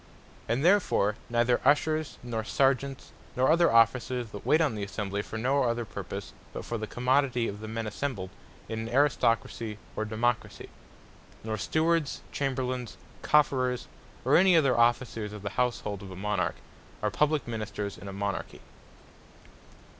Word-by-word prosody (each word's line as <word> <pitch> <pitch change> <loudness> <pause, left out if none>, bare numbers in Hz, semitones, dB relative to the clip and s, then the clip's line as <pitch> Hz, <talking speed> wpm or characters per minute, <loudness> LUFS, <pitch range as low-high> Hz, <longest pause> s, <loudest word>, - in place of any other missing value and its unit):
And 120 +7 0
therefore 175 - +3
neither 120 +1 +2
Ushers, 155 +2 +2
nor 115 -2 -3
Sergeants, 135 +2 0 0.2
nor 130 +3 +3
other 170 +1 +4
Officers 115 0 +3
that 100 - -8
waite 155 - +4
on 155 -7 +2
the 105 - -5
Assembly, 100 0 -3
for 110 - -7
no 135 +5 +2
other 120 -1 0
purpose, 95 - -7 0.2
but - - -6
for 115 - -3
the 110 - -4
commodity 125 0 +1
of 100 - -5
the 110 - -7
men 115 +1 -3
assembled, 105 -4 -4 0.4
in 110 - -4
an 115 0 -4
Aristocracy, 115 -4 +1 0.2
or - - -1
Democracy; 115 +2 -1 0.7
nor 110 0 -2
Stewards, 160 - 0
Chamberlains, 130 -4 -2 0.2
Cofferers, 130 -4 +2 0.4
or - - +5
any 185 -1 +6
other 135 -6 +4
Officers 120 -3 +1
of 105 -2 -8
the 100 - -3
houshold 115 -5 -1
of 100 - -9
a 95 - -8
Monarch, 100 -2 -1 0.5
are 105 - +1
Publique 150 +3 +1
Ministers 105 -3 -4
in 100 - -10
a - - -5
Monarchy. 100 -1 -4
120 Hz, 155 wpm, -28 LUFS, 110-135 Hz, 0.7 s, any